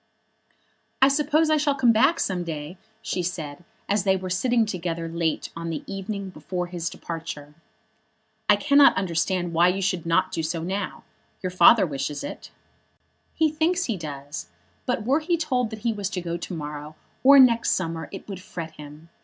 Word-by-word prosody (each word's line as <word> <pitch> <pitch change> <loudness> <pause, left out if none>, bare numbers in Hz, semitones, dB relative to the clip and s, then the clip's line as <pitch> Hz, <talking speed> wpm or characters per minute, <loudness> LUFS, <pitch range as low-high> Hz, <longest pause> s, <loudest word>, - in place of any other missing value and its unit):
"I 270 - +6
suppose 305 +2 +2
I 310 - +4
shall 285 -1 +1
come 255 -4 +4
back 230 +10 +3
some 180 -2 -1
day," 160 +2 -6 0.2
she 180 - -2
said, 165 -4 -5 0.2
as 205 -1 +1
they 190 -1 +3
were 185 -1 -5
sitting 235 +4 +2
together 170 -4 -3
late 165 -1 -2
on 165 0 -5
the 160 - -4
evening 195 0 -5
before 180 +2 -4
his 175 -2 -4
departure. 150 -3 -7 1.0
"I 210 - +8
cannot 280 +5 +5
understand 175 0 0
why 170 +2 +5
you 180 +2 +1
should 180 -4 -1
not 165 - +2
do 165 - -2
so 165 +1 -3
now. 190 +2 -4 0.4
Your 185 - -2
father 190 +3 +7
wishes 140 -1 -4
it." - - -7 0.9
"He 315 -1 +2
thinks 335 +4 +1
he 230 - -1
does; 145 -4 -7 0.4
but 245 -3 0
were 275 +5 +3
he 340 +2 0
told 255 -7 0
that 220 -1 -8
he 230 - +2
was 205 -2 -3
to 185 -2 -3
go 170 -1 -3
to 175 +2 -6
morrow, 150 0 -6 0.3
or 280 +2 +8
next 235 -3 +5
summer, 165 -3 -3
it 195 - -9
would 195 -3 -7
fret 165 -3 -7
him. 150 +2 -12
185 Hz, 180 wpm, -25 LUFS, 165-235 Hz, 1.0 s, I